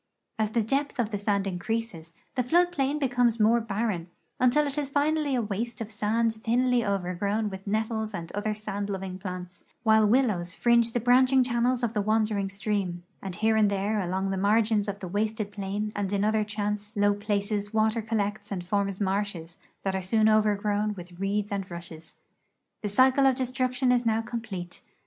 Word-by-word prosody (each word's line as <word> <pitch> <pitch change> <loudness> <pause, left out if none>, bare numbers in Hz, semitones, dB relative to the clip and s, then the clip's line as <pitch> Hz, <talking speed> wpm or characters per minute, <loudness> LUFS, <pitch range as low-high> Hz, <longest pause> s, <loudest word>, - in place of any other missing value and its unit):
As 215 -1 +1
the 225 +1 +1
depth 275 +5 -1
of 230 -3 0
the 205 - -2
sand 200 -1 0
increases, 190 -3 -4 0.2
the 255 - +1
flood 350 +8 +3
plain 280 -2 0
becomes 245 -4 +1
more 225 +2 +4
barren, 205 -5 -2 0.3
until 255 +4 +4
it 280 -1 -3
is 290 -2 -1
finally 290 0 +1
a 240 - +1
waste 220 +3 -3
of 225 -1 -5
sand 220 +2 +1
thinly 240 +2 +1
overgrown 200 +2 -1
with 190 +1 -9
nettles 220 +1 -1
and 170 -5 -6
other 210 +1 -2
sand 205 -1 -4
loving 190 -1 -4
plants, 180 -2 -7 0.2
while 220 -2 +5
willows 210 -7 +1
fringe 235 -1 +3
the 240 - +1
branching 255 +2 +5
channels 245 0 0
of 230 -1 0
the 210 - +1
wandering 215 -2 +1
stream, 195 -3 -2 0.2
and 190 -2 -5
here 220 +3 +2
and 215 -2 +4
there 200 +2 0
along 190 +1 -1
the 195 - -1
margins 210 +1 +2
of 200 0 -4
the 185 - -4
wasted 210 +2 -2
plain 205 +1 -3
and 200 -1 -2
in 200 0 +1
other 215 0 +2
chance 210 0 -3
low 205 0 +4
places 205 0 -2
water 220 +1 +2
collects 215 -2 -2
and 180 -3 -3
forms 200 0 -1
marshes 190 -4 -2 0.2
that 195 - -1
are 190 - -1
soon 215 +4 +2
overgrown 210 -1 +2
with 175 -1 -11
reeds 205 +1 -1
and 195 -2 -3
rushes. 170 -2 -8 0.7
The 210 - -2
cycle 260 +5 +5
of 265 - +3
destruction 255 0 0
is 245 -1 +3
now 225 -1 +1
complete. 220 -7 -6
215 Hz, 185 wpm, -27 LUFS, 200-235 Hz, 0.7 s, while